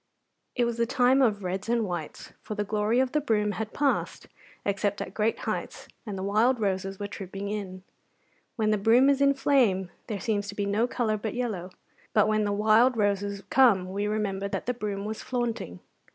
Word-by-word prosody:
It 245 Hz, -, +2 dB
was 235 Hz, -1 st, -2 dB
the 235 Hz, 0 st, +1 dB
time 260 Hz, +1 st, +3 dB
of 210 Hz, -6 st, +2 dB
reds 190 Hz, +4 st, -3 dB
and 235 Hz, -2 st, +2 dB
whites, 175 Hz, -5 st, -6 dB
for 215 Hz, -, -6 dB
the 210 Hz, -, -1 dB
glory 210 Hz, +3 st, +1 dB
of 260 Hz, -1 st, +1 dB
the 300 Hz, -, +1 dB
broom 210 Hz, -6 st, +1 dB
had 220 Hz, +1 st, -4 dB
passed, 285 Hz, -1 st, -1 dB, 0.4 s
except 200 Hz, 0 st, 0 dB
at 185 Hz, -, -5 dB
great 220 Hz, +1 st, 0 dB
heights, -, -, -4 dB, 0.2 s
and 200 Hz, -2 st, -4 dB
the 190 Hz, -, -4 dB
wild 220 Hz, +6 st, +2 dB
roses 195 Hz, -1 st, -1 dB
were 205 Hz, -, -3 dB
trooping 195 Hz, 0 st, -6 dB
in. 190 Hz, -3 st, -5 dB, 0.7 s
When 215 Hz, -3 st, +1 dB
the 215 Hz, -, +1 dB
broom 240 Hz, +7 st, +5 dB
is 280 Hz, 0 st, 0 dB
in 280 Hz, 0 st, +4 dB
flame 215 Hz, -11 st, +2 dB, 0.2 s
there 210 Hz, -2 st, -3 dB
seems 205 Hz, -2 st, -1 dB
to 205 Hz, -, -6 dB
be 205 Hz, -, -1 dB
no 210 Hz, +4 st, +1 dB
colour 225 Hz, -3 st, -1 dB
but 210 Hz, +1 st, -4 dB
yellow; 215 Hz, -8 st, -3 dB, 0.4 s
but 210 Hz, -1 st, +4 dB
when 215 Hz, -1 st, +1 dB
the 205 Hz, -, 0 dB
wild 220 Hz, +4 st, +4 dB
roses 200 Hz, -1 st, 0 dB
come 200 Hz, -9 st, +4 dB
we 205 Hz, +2 st, -1 dB
remember 200 Hz, -2 st, -1 dB
that -, -, -4 dB
the 250 Hz, -, 0 dB
broom 205 Hz, -4 st, -4 dB
was 215 Hz, +1 st, -4 dB
flaunting. 235 Hz, -, -3 dB
210 Hz, 200 wpm, -27 LUFS, 200-235 Hz, 0.7 s, broom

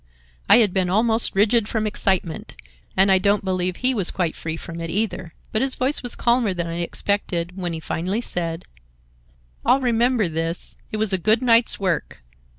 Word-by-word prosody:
I -, -, +9 dB
had 215 Hz, -6 st, +3 dB
been 185 Hz, -2 st, 0 dB
almost 220 Hz, +3 st, +2 dB
rigid 210 Hz, +2 st, +3 dB
from 220 Hz, -1 st, -1 dB
excitement, 190 Hz, -5 st, -1 dB, 0.4 s
and 195 Hz, +1 st, +5 dB
I 190 Hz, -, +5 dB
don't 200 Hz, +1 st, +1 dB
believe 185 Hz, -1 st, -1 dB
he 255 Hz, +5 st, +1 dB
was 200 Hz, -7 st, +1 dB
quite 175 Hz, -4 st, -2 dB
free 160 Hz, 0 st, -4 dB
from 170 Hz, +1 st, -8 dB
it 165 Hz, -, -4 dB
either. 185 Hz, -2 st, -2 dB, 0.2 s
But 215 Hz, -, 0 dB
his 265 Hz, 0 st, +1 dB
voice 265 Hz, +4 st, -1 dB
was 245 Hz, -, -1 dB
calmer 235 Hz, -5 st, +1 dB
than 175 Hz, -1 st, -1 dB
I 170 Hz, 0 st, -4 dB
expected 175 Hz, -1 st, -2 dB
when 180 Hz, -3 st, -4 dB
he 160 Hz, -, -4 dB
finally 185 Hz, +7 st, -3 dB
said: 170 Hz, -6 st, -4 dB, 1.0 s
"I'll 265 Hz, -, +4 dB
remember 240 Hz, -3 st, +1 dB
this. 165 Hz, +1 st, -3 dB, 0.2 s
It 215 Hz, -, -3 dB
was 215 Hz, -2 st, 0 dB
a 190 Hz, -, +1 dB
good 220 Hz, +7 st, +2 dB
night's 230 Hz, -1 st, +4 dB
work." 180 Hz, -, -2 dB
195 Hz, 185 wpm, -22 LUFS, 175-225 Hz, 1.0 s, I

